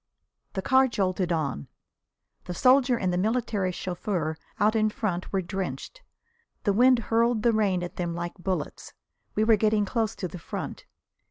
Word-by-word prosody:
The 190 - -3
car 265 0 +5
jolted 185 -6 -1
on. 140 - -2 0.8
The 180 - -5
soldier 255 +2 +4
and 185 -4 0
the 180 - +1
military 215 -3 0
chauffeur 175 -3 -3 0.2
out 210 +2 +3
in 215 -1 +3
front 195 -5 -3
were 195 -1 0
drenched. 185 - -5 0.6
The 200 - +2
wind 250 +4 +5 0.2
hurled 230 -1 +3
the 235 - +4
rain 195 -5 +1
at 175 - -7
them 170 -2 -2
like 175 0 -4
bullets. 185 0 -4 0.4
We 215 - +2
were 220 -1 +5
getting 215 0 +2
close 225 +1 -1
to 185 - -4
the 180 - -9
front. - - -6
200 Hz, 165 wpm, -27 LUFS, 180-225 Hz, 0.8 s, car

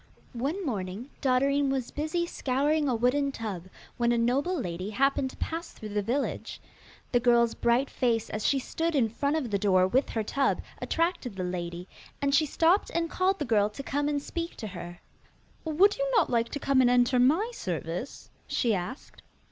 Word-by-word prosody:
One 290 +11 -2
morning 205 +1 -4
Dotterine 275 +2 +2
was 265 -3 -2
busy 315 +4 -1
scouring 290 0 0
a 250 - +1
wooden 265 +4 +1
tub, 210 -8 -5 0.3
when 235 0 +2
a 240 - +2
noble 275 +10 +1
lady 180 -3 -4
happened 265 +4 +1
to - - -13
pass 330 +1 -4
through 215 - -8
the 205 0 -1
village. 245 +8 -2 0.5
The 245 - +4
girl's 235 -1 +4
bright 235 +3 +2
face 235 -5 0
as 215 - -3
she 275 - +3
stood 325 +5 -2
in 270 - +4
the - - -19
front 280 +5 0
of 270 -8 -2
the 200 - +1
door 185 -2 +4
with 260 +8 +1
her 225 - -1
tub 275 +6 0 0.2
attracted 330 - -1
the 185 - -3
lady, 175 0 -4 0.3
and 280 0 0
she 305 +2 +4
stopped 335 +7 +3
and 335 -1 0
called 380 +1 +1
the 295 - -2
girl 210 -4 +3
to 215 +6 -8
come 290 +2 -1
and 290 -1 0
speak 335 +4 -5
to 220 - -7
her. 175 -1 -8 0.7
'Would 360 +7 +4
you - - -1
not 360 - +3
like 230 -1 +1
to 285 - -4
come 275 -1 +3
and 245 - +4
enter 245 +1 +3
my 320 - +3
service?' 175 - -5 0.2
she 235 -3 +1
asked. 200 +9 -5
255 Hz, 195 wpm, -28 LUFS, 220-290 Hz, 0.7 s, The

